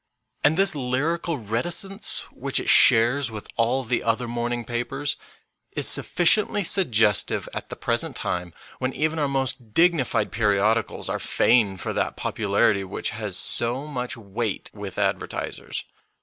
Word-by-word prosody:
And 155 +3 +4
this 195 +1 +3
lyrical 150 +5 -1
reticence, 165 - -1
which - - -1
it - - -2
shares 120 +3 +6
with 110 -2 -8
all 120 +3 +1
the 125 0 -1
other 115 +2 0
morning 120 0 -2
papers, 135 +5 -2 0.6
is - - 0
suffi 175 - +1
ciently 205 +1 +3
suggestive 110 - +2
at - - -6
the - - -5
present - - -1
time, 90 0 -3 0.3
when 130 0 -1
even 155 +1 -1
our 145 - +1
most 130 -4 -3
dignified 165 -11 +2
periodicals 105 +1 +1
are - - -2
fain 105 -6 +2
for 90 - -3
that - - -1
popularity 100 -1 +1
which 95 - -2
has 105 -4 -1
so 120 +4 -1
much 125 -3 -4
weight 110 0 -4
with 100 -3 -8
advertisers. - - -2
120 Hz, 145 wpm, -24 LUFS, 110-145 Hz, 0.6 s, shares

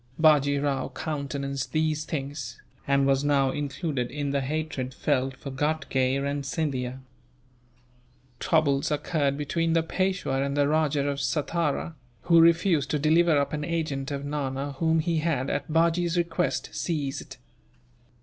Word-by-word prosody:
Bajee 145 -3 +5
Rao 140 -1 -1
countenanced 140 -3 -4
these 155 -1 0
things, 140 -5 -5 0.3
and 140 0 +3
was 135 0 +2
now 140 -2 +3
included 140 -3 -2
in 145 -1 -3
the 140 0 +1
hatred 135 -2 -3
felt 135 -2 0
for 140 - -7
Ghatgay 135 -2 0
and 140 +1 -2
Scindia. 135 -4 -2 1.4
Troubles 140 -4 +2
occurred 145 -2 0
between 165 +3 0
the 165 -1 +3
Peishwa 180 -6 -1
and 140 +1 -2
the 145 -1 +3
Rajah 150 -2 +1
of 140 -1 -1
Satara, 150 +4 -1 0.3
who 170 -1 +6
refused 165 -3 +4
to 150 - +1
deliver 160 +2 +4
up 140 0 0
an 150 0 -2
agent 155 -4 -2
of 140 -1 -4
Nana 140 -1 -3
whom 160 -1 +3
he 170 0 0
had, 155 -5 0
at 145 +2 -3
Bajee's 170 +2 +2
request, 170 +1 0
seized. 145 -5 -3
145 Hz, 140 wpm, -26 LUFS, 140-160 Hz, 1.4 s, who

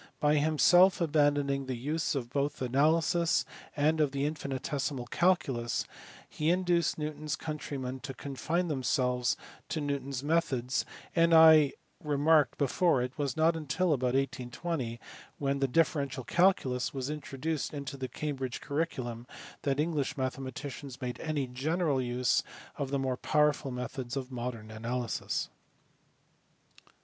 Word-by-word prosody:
By 150 0 +3
himself 175 +5 +5
abandoning 145 -4 +2
the 130 - -2
use 150 +6 -1
both 140 +3 -2
of 130 - -1
analysis 160 +4 +3 0.3
and 155 +2 +3
of 145 -2 +1
the 140 0 0
infinitesimal 140 -2 -3
calculus 130 -7 +1 0.4
he 155 +1 -1
induced 175 -1 +2
Newton 150 0 -4
s 150 - 0
countrymen 140 -4 -5
to 135 0 -7
confine 160 +6 -2
them 145 -5 -2
selves 125 -2 +1 0.3
to 160 - -2
Newton 140 -2 -2
s 135 -1 -4
methods, 140 -5 0 0.3
and 165 0 +4
as - - +9
I 160 -3 +8 0.3
remarked 150 0 +3
before 140 -1 +2
it 125 +1 -5
was 140 -2 -1
riot 165 +1 +4
until 160 +2 0
about 130 -2 0
1820, 130 -1 -2 0.4
when 140 -1 -1
the 135 - +2
differential 140 -2 +1
calculus 140 -8 +2
was 135 +2 -2
introduced 150 0 -3
into 140 -1 -5
the 130 -1 -4
Cambridge 135 -3 -4
curriculum, 130 -6 -3 0.3
that 140 0 0
English 150 -4 0
mathematicians 130 0 -5
made 125 -2 -4
any 155 -4 -1
general 140 +3 0
use 125 0 +1 0.3
of 140 - -3
the 140 - 0
more 130 -2 -1
powerful 150 -1 +2
methods 125 +1 -4
of 135 -1 -4
modern 120 -3 -5
analysis. 115 +1 -3
140 Hz, 140 wpm, -30 LUFS, 130-155 Hz, 0.4 s, as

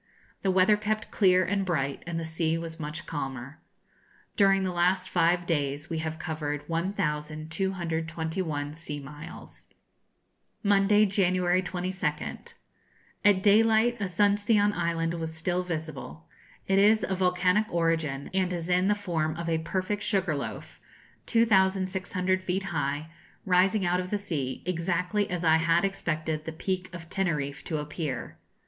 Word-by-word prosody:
The 195 - 0
weather 190 +3 +4
kept 215 +1 -2
clear 185 -3 +4
and 195 +1 0
bright, 140 -7 -1
and 170 -1 -2
the 165 - -4
sea 160 0 0
was 165 0 -6
much 150 +1 -5
calmer. 135 -2 -5 0.8
During 195 -1 +4
the 185 - -1
last 180 +2 +1
five 175 0 +2
days 145 -2 -1
we 165 - -1
have 160 0 -3
covered 150 -3 -4
1,221 160 -2 -2
sea 155 -2 -6
miles. 150 +3 -10 1.0
Monday, 205 +1 +4
January 185 -2 +2
22nd. 180 -4 -4 0.7
At 200 -2 +4
daylight 225 +3 +4
Asuncion 205 +2 +2
Island 170 -1 -1
was 160 -1 -4
still 175 +2 0
visible. 155 - -6 0.4
It 195 0 +3
is 215 +2 +5
of 190 -1 -2
volcanic 180 +3 +2
origin, 165 -5 0
and 185 -1 +1
is 175 -1 -3
in 180 +1 +3
the 210 - +3
form 165 -6 -2
of 170 0 -5
a 165 -1 +1
perfect 185 +5 -2
sugar 190 -6 +1
loaf, 140 - -6 0.5
2,600 190 -4 +2
feet 185 +1 -1
high, 150 -3 -2 0.3
rising 190 +2 +3
out 175 +1 +2
of 180 0 -4
the 210 - 0
sea, 145 -10 -4
exactly 180 +3 0
as 180 -1 -3
I 160 -1 +5
had 165 +3 +3
expected 155 -5 -2
the 160 - -4
Peak 185 +2 -3
of 170 -2 -9
Teneriffe 150 -7 -2
to 155 - -2
appear. 150 -3 -5
175 Hz, 140 wpm, -28 LUFS, 160-190 Hz, 1.0 s, is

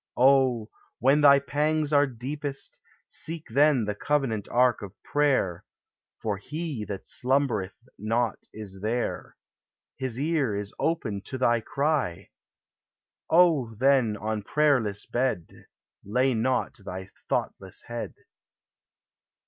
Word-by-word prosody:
Oh, 130 -4 +4 0.3
when 135 +5 +4
thy 140 -1 +8
pangs 150 +2 0
are 145 0 +5
deepest, 140 +3 -5 0.3
Seek 165 0 -5
then 140 -1 +4
the 105 - -1
covenant 120 -3 -1
ark 125 0 +3
of 100 -3 -8
prayer; 135 -12 +1 0.6
For 105 -2 -2
He 150 - -5
that 100 -2 -6
slumbereth 125 -4 0
not 115 +2 -1
is 100 -3 -9
there 115 +3 -3 0.6
His 130 -3 -3
ear 145 -7 0
is 100 0 -4
open 120 -12 -1
to 130 - -5
thy 120 -2 +3
cry. 135 - -1 1.0
Oh, 160 -10 +4
then, 125 -3 +3
on 110 0 -2
prayerless 125 -6 +1
bed 120 -9 -2 0.4
Lay 125 +6 +1
not 120 +2 0
thy 95 0 -6 0.2
thoughtless - - -3
head. - - -6
125 Hz, 115 wpm, -27 LUFS, 110-145 Hz, 1.0 s, thy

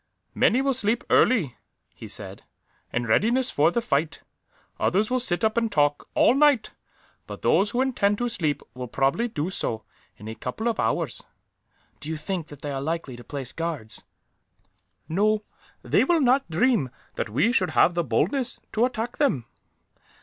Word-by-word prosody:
"Many 255 +4 +3
will 275 0 +2
sleep 230 -1 +1
early," 165 - +3 0.4
he - - -10
said, - - -6 0.5
"in 120 0 -1
readiness 235 - +2
for 150 +3 +3
the 235 +7 -1
fight. 150 -1 -1 0.6
Others 210 +5 +1
will 255 - +2
sit 210 -5 0
up 220 +1 +1
and 230 -2 +1
talk, 145 -3 +1
all - - +5
night; 280 -5 +3 0.6
but - - -9
those 205 - +3
who 245 +4 0
intend 205 -6 +1
to 245 - -1
sleep 155 - -1
will 125 0 -6
probably 135 - +1
do 175 -5 -3
so, 110 - -2 0.3
in 105 - -10
a 110 - -5
couple 125 - -4
of 230 -1 -1
hours." - - 0 0.8
"Do 150 - -7
you 160 - -2
think 170 +1 -4
that 145 -2 -13
they 145 - -3
are 135 -1 -3
likely 160 -3 -3
to 120 - -11
place 135 +1 -6
guards?" 160 -10 -3 1.0
"No; 210 +5 +2 0.4
they - - +3
will 345 -2 +3
not 265 -1 +3
dream 170 - +2 0.2
that - - -3
we 145 - +2
should 190 -7 +2
have 175 - +5
the 170 0 0
boldness 195 - 0
to 225 +3 +2
attack 240 -2 -4
them." 150 - +1
185 Hz, 170 wpm, -25 LUFS, 145-240 Hz, 1.0 s, all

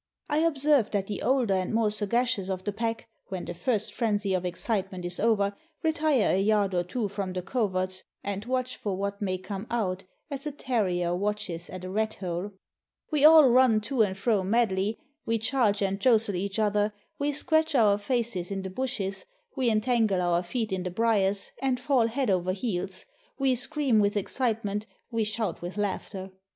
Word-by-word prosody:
I 295 +1 +2
observe 290 -6 +3
that 200 -2 -1
the 205 0 -5
older 250 -6 +2
and 185 -1 0
more 220 -2 +2
sagacious 215 -1 0
of 185 -1 -3
the 205 - -1
pack, 225 +2 -3 0.2
when 185 -2 -5
the - - -5
first 215 +3 -1
frenzy 205 -4 0
of 185 -1 0
excitement 185 0 -2
is 175 0 -4
over, 205 -3 +2 0.3
retire 310 -6 +2
a 190 - +2
yard 205 -1 +2
or 175 - +2
two 210 +5 -2
from 195 -2 -4
the 180 -1 -3
coverts, 185 -4 -1 0.2
and 200 0 -3
watch 255 0 -2
for 195 -3 -3
what 200 +1 -3
may 185 -2 0
come 195 +3 -6
out, 190 -6 -1 0.3
as 275 +1 -3
a - - -2
ter 250 -6 0
rier 175 -1 0
watches 200 -3 -3
at 185 0 -7
a - - -5
rat 220 +2 0
hole. 180 +1 -4 0.6
We 300 -2 +1
all 310 -2 +9
run 250 -3 +5
to 245 +3 0
and 195 -3 +1
fro 210 0 +2
madly, 205 0 +1 0.3
we 230 0 +2
charge 225 -3 +1
and 195 0 0
jostle 225 -2 +3
each 195 +3 -3
other, 210 -1 +1 0.2
we 285 +1 +1
scratch 315 +1 +1
our 210 -4 +4
faces 210 -5 -1
in 195 -1 -3
the 190 - -5
bushes, 200 -5 -3 0.3
we 260 -3 +2
entangle 220 -3 +2
our 175 -1 +2
feet 220 +4 -3
in 190 -1 -1
the 180 - -3
briers, 200 -1 +1
and 260 -2 +1
fall 250 -3 +2
head 245 -1 0
over 185 0 +1
heels, 190 -3 -3 0.3
we 270 -1 +2
scream 260 -2 +1
with 205 0 +2
excitement, 215 -1 -1 0.2
we 230 -1 +1
shout 215 -4 -2
with 175 +3 -6
laughter. 195 -1 -3
210 Hz, 190 wpm, -28 LUFS, 190-240 Hz, 0.6 s, all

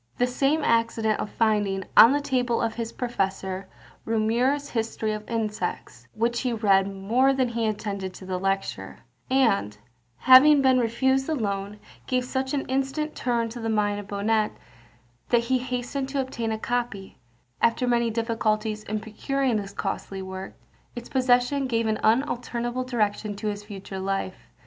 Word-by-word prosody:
The 245 - +3
same 275 +5 +1
accident 230 -2 +1
of - - -3
finding, 205 -4 +1
on 230 - +9
the 290 +1 +1
table 250 -4 0
of 225 -1 0
his 230 -1 -4
professor, 195 -5 -3 0.4
Reaumur's 235 +6 +1
History 225 -1 -2
of 215 0 -7
Insects, 220 -2 -3
which 235 +2 0
he 250 -2 -1
read 200 -3 +3
more 230 +8 +2
than 260 -2 +1
he 230 -1 -1
attended 200 -3 -3
to 190 - -10
the 185 -1 -3
lecture, 195 +1 -2 0.3
and, 225 - +2 0.4
having 270 +4 +8
been 260 -1 +5
refused 265 +3 +1
the 320 - 0
loan, 200 -3 -3 0.3
gave 255 -1 0
such 265 +2 -2
an 275 - -2
instant 270 +4 -1
turn 235 -2 0
to 240 +2 -8
the 225 -1 -3
mind 205 -1 +1
of 205 - -9
Bonnet, 210 +1 0 0.8
that 240 - +4
he 255 +2 +1
hastened 255 +2 -3
to 275 0 -2
obtain 235 -3 -3
a 220 - -1
copy; 235 -4 -3 0.4
after 230 +2 +2
many 235 -1 +2
difficulties 220 -1 -1
in 215 0 -4
procuring 250 +3 -1
this 200 -1 -5
costly 195 -1 -4
work, 190 0 -7 0.4
its 240 0 -8
possession 255 +1 +2
gave 230 -2 0
an 220 -1 0
unalterable 240 0 0
direction 215 -4 -1
to 210 +1 -3
his 205 0 -5
future 195 -2 -8
life. 195 -1 -3
230 Hz, 160 wpm, -25 LUFS, 210-255 Hz, 0.8 s, on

